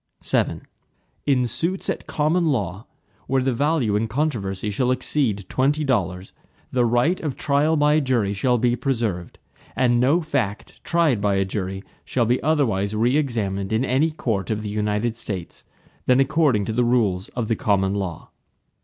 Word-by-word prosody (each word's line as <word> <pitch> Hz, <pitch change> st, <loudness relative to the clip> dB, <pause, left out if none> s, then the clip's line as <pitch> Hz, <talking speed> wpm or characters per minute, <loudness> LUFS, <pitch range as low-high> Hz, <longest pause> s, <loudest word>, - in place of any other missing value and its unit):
VII -, -, 0 dB, 0.7 s
In 130 Hz, -3 st, +3 dB
suits 170 Hz, -, -2 dB
at -, -, -3 dB
common 160 Hz, +3 st, +1 dB
law, 105 Hz, -, -2 dB, 0.4 s
where 135 Hz, -1 st, +1 dB
the 130 Hz, -1 st, +1 dB
value 140 Hz, -5 st, +1 dB
in 110 Hz, +2 st, 0 dB
controversy 110 Hz, -7 st, -2 dB
shall 125 Hz, +5 st, 0 dB
exceed 125 Hz, -6 st, 0 dB
twenty 145 Hz, +7 st, +1 dB
dollars, 95 Hz, -, -1 dB, 0.4 s
the 125 Hz, -1 st, +2 dB
right 120 Hz, +10 st, +2 dB
of 150 Hz, -5 st, -3 dB
trial 150 Hz, +2 st, +2 dB
by 150 Hz, +1 st, +4 dB
jury 120 Hz, -8 st, 0 dB
shall 125 Hz, +5 st, +1 dB
be 120 Hz, +1 st, +2 dB
preserved, 115 Hz, -9 st, -2 dB, 0.4 s
and 120 Hz, -2 st, +3 dB
no 140 Hz, +7 st, +3 dB
fact 140 Hz, -, -3 dB
tried 160 Hz, -10 st, +2 dB
by 100 Hz, -1 st, +2 dB
a 95 Hz, 0 st, +1 dB
jury 95 Hz, 0 st, -4 dB, 0.2 s
shall 120 Hz, -3 st, 0 dB
be 125 Hz, +3 st, +1 dB
otherwise 110 Hz, -10 st, +1 dB
re 120 Hz, +5 st, +2 dB
examined 105 Hz, -9 st, -1 dB
in 110 Hz, +4 st, +1 dB
any 135 Hz, +5 st, +2 dB
court 115 Hz, -, -2 dB
of 110 Hz, -1 st, -2 dB
the 105 Hz, -, -4 dB
United 105 Hz, +2 st, -1 dB
States, 95 Hz, -6 st, -6 dB, 0.4 s
than 125 Hz, +1 st, +5 dB
according 135 Hz, -6 st, +2 dB
to 110 Hz, -, -3 dB
the 120 Hz, +2 st, +2 dB
rules 110 Hz, -6 st, +1 dB
of 120 Hz, -3 st, -2 dB
the 115 Hz, -, +1 dB
common 100 Hz, -2 st, +1 dB
law. 95 Hz, -5 st, -4 dB
120 Hz, 165 wpm, -23 LUFS, 100-140 Hz, 0.7 s, than